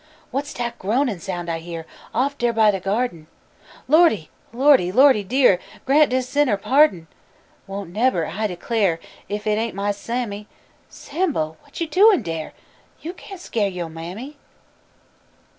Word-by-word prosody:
Whass 285 Hz, +3 st, -3 dB
dat 240 Hz, -1 st, -4 dB
groanin' 225 Hz, 0 st, 0 dB
soun' 175 Hz, -2 st, -5 dB
I 165 Hz, -1 st, -2 dB
hear 165 Hz, -1 st, -7 dB, 0.3 s
Off 275 Hz, +4 st, 0 dB
dar 240 Hz, -4 st, +1 dB
by 220 Hz, -2 st, +5 dB
de 195 Hz, -, -3 dB
gyardin? 195 Hz, -4 st, -2 dB, 0.6 s
Lordy! 300 Hz, -, +4 dB, 0.2 s
Lordy! 255 Hz, -7 st, +4 dB
Lordy 260 Hz, -1 st, +5 dB
dear, 240 Hz, -3 st, +3 dB, 0.3 s
Grant 295 Hz, +2 st, +5 dB
dis 255 Hz, 0 st, 0 dB
sinner 285 Hz, -6 st, +2 dB
pardon! 260 Hz, -, +3 dB
I 195 Hz, -, -24 dB
won't 195 Hz, -3 st, -6 dB
nebber 215 Hz, -6 st, +1 dB
I 215 Hz, +8 st, -2 dB
declar' 190 Hz, -2 st, 0 dB, 0.3 s
Ef 205 Hz, 0 st, -4 dB
it 210 Hz, 0 st, +1 dB
ain't 225 Hz, -3 st, -3 dB
my 200 Hz, +1 st, 0 dB
Sammy! 210 Hz, 0 st, -4 dB, 0.4 s
Sambo, 285 Hz, -, -2 dB
what -, -, -12 dB
yo' 335 Hz, -, 0 dB
doin' 380 Hz, -, +5 dB
dar? 165 Hz, -3 st, -4 dB, 0.5 s
Yo' 335 Hz, +3 st, -6 dB
can't 390 Hz, 0 st, -11 dB
skeer 220 Hz, -, -1 dB
yo' 180 Hz, -3 st, -5 dB
mammy! 185 Hz, -, -8 dB
220 Hz, 150 wpm, -22 LUFS, 185-270 Hz, 0.6 s, by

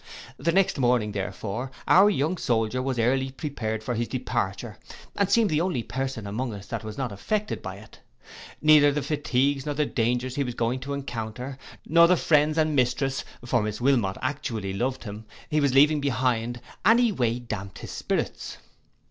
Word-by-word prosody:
The 170 Hz, -, 0 dB
next 190 Hz, -4 st, +2 dB
morning, 120 Hz, -4 st, +2 dB
therefore, 100 Hz, +5 st, -4 dB, 0.2 s
our 195 Hz, +3 st, +7 dB
young 165 Hz, -2 st, 0 dB
soldier 115 Hz, -2 st, 0 dB
was 130 Hz, -1 st, -2 dB
early 130 Hz, +3 st, +1 dB
prepared 125 Hz, -6 st, -4 dB
for 125 Hz, -, -2 dB
his 120 Hz, 0 st, -1 dB
departure, 120 Hz, -4 st, -3 dB, 0.4 s
and 200 Hz, -1 st, +1 dB
seemed 215 Hz, -2 st, +3 dB
the 155 Hz, +1 st, +2 dB
only 170 Hz, -10 st, -1 dB
person 130 Hz, -4 st, -4 dB
among 110 Hz, +3 st, -3 dB
us 100 Hz, -1 st, -9 dB
that 115 Hz, -2 st, -4 dB
was 110 Hz, -1 st, -7 dB
not 130 Hz, -4 st, -2 dB
affected 210 Hz, -, -2 dB
by -, -, -6 dB
it. -, -, -15 dB, 0.6 s
Neither 150 Hz, -2 st, +7 dB
the 145 Hz, 0 st, -2 dB
fatigues 140 Hz, -1 st, 0 dB
and 145 Hz, 0 st, -1 dB
dangers 125 Hz, +2 st, 0 dB
he 140 Hz, -, +2 dB
was 125 Hz, -3 st, -5 dB
going 120 Hz, +2 st, 0 dB
to 140 Hz, +2 st, -4 dB
encounter, 125 Hz, -1 st, -5 dB, 0.3 s
nor 170 Hz, +1 st, +6 dB
the 180 Hz, +1 st, +4 dB
friends 150 Hz, 0 st, +3 dB
and 155 Hz, -1 st, +2 dB
mistress, 135 Hz, +1 st, +1 dB, 0.2 s
for 120 Hz, -1 st, +2 dB
Miss 105 Hz, 0 st, -3 dB
Wilmot 120 Hz, -7 st, +2 dB
actually 115 Hz, -7 st, -3 dB
loved 130 Hz, +6 st, -2 dB
him, 105 Hz, 0 st, -8 dB, 0.3 s
he 150 Hz, 0 st, +2 dB
was 140 Hz, -2 st, +2 dB
leaving 150 Hz, +2 st, +5 dB
behind, 120 Hz, -3 st, 0 dB, 0.2 s
any 235 Hz, +1 st, +5 dB
way 120 Hz, -, 0 dB
damped 105 Hz, -5 st, -6 dB
his -, -, -8 dB
spirits. -, -, -3 dB
130 Hz, 175 wpm, -26 LUFS, 115-145 Hz, 0.6 s, our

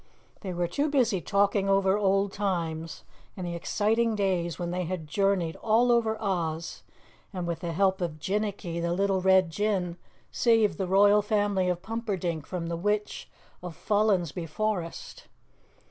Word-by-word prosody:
They 190 Hz, -, -5 dB
were 175 Hz, 0 st, -1 dB
too 285 Hz, -, -1 dB
busy 240 Hz, -10 st, +2 dB
talking 200 Hz, +1 st, +1 dB
over 195 Hz, 0 st, +3 dB
old 195 Hz, -1 st, +1 dB
times 165 Hz, -5 st, -3 dB, 0.3 s
and 185 Hz, -, -4 dB
the 175 Hz, -, -4 dB
exciting 220 Hz, +6 st, 0 dB
days 180 Hz, -5 st, -1 dB
when 175 Hz, -1 st, -3 dB
they 180 Hz, 0 st, -2 dB
had 175 Hz, -2 st, -4 dB
journeyed 180 Hz, 0 st, 0 dB
all 230 Hz, +3 st, +3 dB
over 225 Hz, -2 st, +2 dB
Oz, 170 Hz, -5 st, -3 dB, 0.5 s
and 180 Hz, -3 st, -4 dB
with 170 Hz, -1 st, -3 dB
the 170 Hz, 0 st, -4 dB
help 190 Hz, +2 st, +1 dB
of 165 Hz, -3 st, -3 dB
Jinnicky, 195 Hz, -2 st, -2 dB
the 170 Hz, 0 st, 0 dB
little 195 Hz, 0 st, +1 dB
Red 190 Hz, -2 st, +4 dB
Jinn, 185 Hz, -2 st, -1 dB, 0.3 s
saved 225 Hz, -3 st, +2 dB
the 190 Hz, -, -1 dB
Royal 205 Hz, +2 st, +5 dB
Family 205 Hz, -3 st, +1 dB
of 180 Hz, 0 st, -2 dB
Pumperdink 190 Hz, -8 st, -3 dB
from 180 Hz, -2 st, -4 dB
the 170 Hz, 0 st, -3 dB
Witch 210 Hz, +3 st, -2 dB, 0.3 s
of 175 Hz, -2 st, -7 dB
Follensby 190 Hz, -6 st, 0 dB
Forest. 180 Hz, 0 st, -4 dB
190 Hz, 155 wpm, -27 LUFS, 170-210 Hz, 0.5 s, Royal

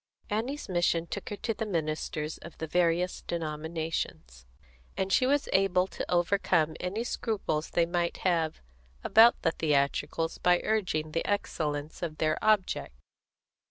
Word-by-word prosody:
Annie's 245 Hz, +8 st, -2 dB
mission 175 Hz, -2 st, +1 dB
took -, -, -6 dB
her 205 Hz, -, -3 dB
to 225 Hz, +2 st, -2 dB
the 220 Hz, -, -4 dB
ministers 155 Hz, -4 st, -2 dB
of 170 Hz, -, -11 dB
the 160 Hz, -, -3 dB
various 175 Hz, +2 st, +1 dB
denominations, 160 Hz, -, -4 dB, 0.5 s
and 190 Hz, 0 st, 0 dB
she 255 Hz, -, +4 dB
was 285 Hz, +1 st, +2 dB
able 190 Hz, -1 st, +3 dB
to -, -, -6 dB
overcome 175 Hz, -3 st, +2 dB
any 195 Hz, +6 st, -2 dB
scruples 200 Hz, -10 st, -2 dB
they 170 Hz, -, +2 dB
might 170 Hz, 0 st, -1 dB
have 165 Hz, -3 st, +1 dB, 0.4 s
about 230 Hz, +2 st, +6 dB
the 165 Hz, -, +3 dB
theatricals 155 Hz, +2 st, 0 dB
by 180 Hz, 0 st, +4 dB
urging 175 Hz, -8 st, 0 dB
the 165 Hz, -, -1 dB
excellence 150 Hz, -6 st, -2 dB
of 160 Hz, -3 st, -4 dB
their 155 Hz, -1 st, 0 dB
object. 215 Hz, -3 st, +1 dB
170 Hz, 140 wpm, -29 LUFS, 155-195 Hz, 0.5 s, about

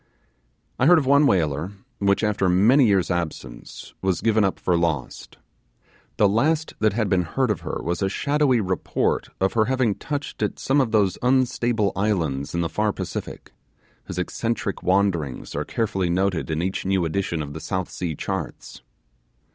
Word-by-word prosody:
I 130 Hz, -, +4 dB
heard 175 Hz, +1 st, +7 dB
of 150 Hz, -, +1 dB
one 140 Hz, +2 st, +5 dB
whaler, 80 Hz, -, 0 dB, 0.3 s
which 100 Hz, +1 st, +2 dB
after 105 Hz, -3 st, +1 dB
many 115 Hz, +9 st, +5 dB
years' 95 Hz, -3 st, +2 dB
absence 80 Hz, -8 st, -5 dB
was 95 Hz, -2 st, 0 dB
given 110 Hz, -1 st, +3 dB
up 95 Hz, -, 0 dB
for 90 Hz, -, +1 dB
lost. 80 Hz, -6 st, -2 dB, 0.8 s
The 105 Hz, -, +5 dB
last 150 Hz, +10 st, +1 dB
that 110 Hz, -1 st, +2 dB
had 110 Hz, -1 st, 0 dB
been 95 Hz, -2 st, +2 dB
heard 115 Hz, +8 st, 0 dB
of 105 Hz, -, -2 dB
her -, -, -4 dB
was 85 Hz, +3 st, -2 dB
a 95 Hz, -, +1 dB
shadowy 140 Hz, +2 st, +1 dB
report 95 Hz, -2 st, -1 dB
of 95 Hz, 0 st, +1 dB
her 110 Hz, -2 st, +3 dB
having 130 Hz, -3 st, +1 dB
touched 145 Hz, +4 st, -5 dB
at 105 Hz, -, -1 dB
some 140 Hz, +2 st, +2 dB
of 120 Hz, -4 st, -1 dB
those 100 Hz, -4 st, +2 dB
unstable 120 Hz, -4 st, +1 dB
islands 85 Hz, -9 st, -1 dB
in 85 Hz, -, +1 dB
the 85 Hz, -, 0 dB
far 105 Hz, +7 st, 0 dB
Pacific, 95 Hz, -3 st, -6 dB, 0.5 s
whose -, -, -7 dB
eccentric 105 Hz, +2 st, -2 dB
wanderings 90 Hz, -8 st, 0 dB
are -, -, -2 dB
carefully 95 Hz, -5 st, -1 dB
noted 90 Hz, -1 st, 0 dB
in 80 Hz, +1 st, -1 dB
each 95 Hz, +1 st, -2 dB
new 95 Hz, -2 st, +1 dB
edition 85 Hz, -1 st, -2 dB
of 70 Hz, 0 st, -8 dB
the 80 Hz, -, -6 dB
South 95 Hz, -2 st, -3 dB
Sea 85 Hz, -4 st, -4 dB
charts. -, -, -5 dB
100 Hz, 170 wpm, -23 LUFS, 85-115 Hz, 0.8 s, heard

